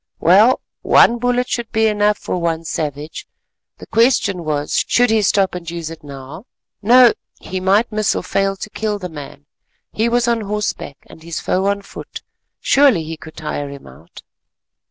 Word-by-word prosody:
Well, 205 +9 +5 0.2
one 240 +1 +5
bullet 245 +1 0
should 235 -2 -3
be 220 0 +2
enough 210 -1 +2
for - - -4
one 165 -1 -1
savage: 150 -1 -5 0.5
the - - -11
question 225 -6 +2
was 150 -2 -1
should 245 -1 +3
he 220 -1 +3
stop 195 -1 +2
and 175 -2 -6
use 165 -1 -5
it 165 - -11
now? 140 - -10 0.3
No, 240 +3 +6 0.3
he 185 - -5
might 200 +5 +2
miss 215 0 0
or - - -3
fail 195 +1 0
to 205 - -8
kill 215 -1 -2
the 180 -2 -6
man; 145 -2 -10 0.5
he 225 +2 +1
was 240 0 +1
on 235 -1 +1
horseback 210 -8 -4
and - - -15
his 165 0 -5
foe 190 +2 0
on 200 0 -1
foot, - - -10 0.4
surely 275 - +4
he 160 +1 -6
could 160 0 -13
tire 150 -2 -4
him 140 -1 -11
out. - - -15
195 Hz, 175 wpm, -18 LUFS, 160-220 Hz, 0.5 s, No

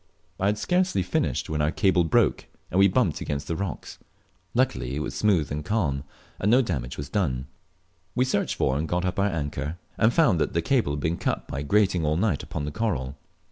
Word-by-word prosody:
I 95 - +2
had 105 +1 +1
scarcely 180 - +1
finished - - -1
when 75 -1 -1
our 75 - +2
cable 95 0 +3
broke, 80 - +2 0.2
and 90 - +2
we 100 - +7
bumped 95 - +1
against 70 -1 -3
the 85 - -1
rocks. 95 -3 -5 0.6
Luckily 65 - +1
it - - -2
was 65 -2 -4
smooth 85 0 +2
and 75 +1 -3
calm, 75 -9 -1 0.3
and 100 - +1
no 125 +4 +5
damage 65 - -3
was 70 - -5
done. 70 -7 -1 0.7
We 125 - +3
searched 130 -5 0
for 65 - +1
and 80 - -2
got 90 +2 0
up 90 +1 -1
our 100 +1 +3
anchor, 75 -2 -3 0.2
and 110 - +5
found 120 - +3
teat - - 0
the 85 - +1
cable 130 - +2
had 70 - -3
been 80 +3 0
cut - - -2
by 70 - -4
grating 95 +2 +2
all 75 +1 +1
night 95 -6 +1
upon 75 - -5
the 75 - -4
coral. 75 - -2
85 Hz, 215 wpm, -26 LUFS, 75-105 Hz, 0.7 s, we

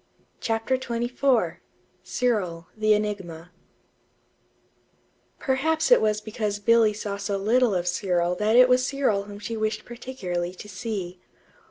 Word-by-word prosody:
CHAPTER 225 +3 0
XXIV 245 +1 0 0.4
CYRIL, 185 -10 -1
THE 215 0 +3
ENIGMA 185 -5 -3 1.9
Perhaps 315 - 0
it - - +7
was 215 -1 +1
because 210 -1 -3
Billy 225 +1 +4
saw 205 -1 -4
so 200 0 -2
little 225 +2 +2
of 175 0 -1
Cyril 175 -1 +1
that 215 +3 +2
it 250 +1 +8
was 255 0 +3
Cyril 255 -8 0
whom 205 0 -9
she 210 +3 -5
wished 215 0 -2
particularly 185 -8 -5
to 210 - -10
see. 185 -3 -5
215 Hz, 130 wpm, -25 LUFS, 195-240 Hz, 1.9 s, it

